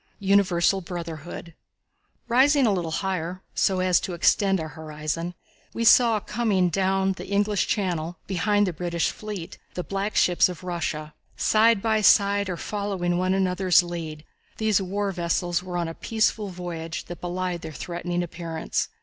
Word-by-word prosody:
Universal 195 -1 +3
Brotherhood. 170 -1 -7 0.7
Rising 265 +3 +4
a 215 - +3
little 175 -3 -2
higher, 185 +1 -3
so 190 -1 +1
as 185 -1 +3
to 180 - -4
extend 195 +3 +3
our 160 -1 -4
horizon, 155 +2 -5 0.4
we 230 - -1
saw 230 -1 +6
coming 210 -4 +1
down 190 +1 +1
the 190 - -7
English 205 +1 +1
channel, 175 -4 -1
behind 205 +2 +1
the 180 - -2
British 170 0 -1
fleet, 205 -6 -7 0.2
the 180 - -3
black 195 +3 -3
ships 180 0 +4
of 180 0 -8
Russia. 160 -4 -3 0.2
Side 220 -1 +4
by 220 -1 +2
side, 200 -1 +4
or 180 - -3
following 190 -4 -2
one 185 +1 +1
another's 185 -1 +3
lead, 160 -3 -6 0.3
these 215 -3 +2
war 200 +1 -2
fleets 175 0 0
were 180 -1 -5
on 170 -1 -1
a 165 - -5
peaceful 220 +1 0
voyage 175 -3 -6
that 175 - -9
belied 180 0 -3
their 160 - -7
threatening 175 +2 -3
appearance. 165 -1 -3
180 Hz, 155 wpm, -25 LUFS, 170-200 Hz, 0.7 s, saw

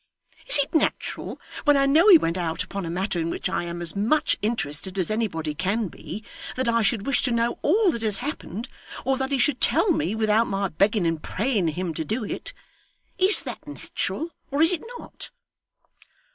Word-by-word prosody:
Is - - +7
it 285 -1 0
natural, 315 - -1 0.2
when 290 -2 +5
I 275 - +3
know 310 +8 +5
he 365 - +11
went 165 - -1
out 170 -3 -2
upon 195 -3 -5
a - - -4
matter 180 +1 -2
in 165 0 -1
which - - -2
I 175 - -2
am 170 0 -5
as 170 - 0
much 225 +10 +2
interested 190 -4 -2
as 185 +2 0
anybody 170 -9 -2
can 195 +6 -1
be, 215 - -8 0.3
that 260 -1 -1
I 230 0 +3
should 210 0 0
wish 275 - +1
to 255 - 0
know 235 0 0
all 390 +4 +3
that 235 - -5
has 215 -3 +4
happened, 245 - -5 0.4
or 265 +1 +2
that 265 0 -2
he 275 - +2
should 260 0 +1
tell 415 - +3
me 195 - 0
without 220 +1 +2
my 195 0 -1
begging 200 +3 +2
and 165 -2 0
praying 210 -4 0
him 170 +2 -2
to 160 - -3
do 220 - -2
it? - - -4 0.7
Is 380 +2 +6
that - - -7
natural, 330 +2 -4 0.2
or 285 +3 +2
is 325 - +5
it 340 - -2 0.2
not? - - -7
220 Hz, 200 wpm, -24 LUFS, 180-275 Hz, 0.7 s, he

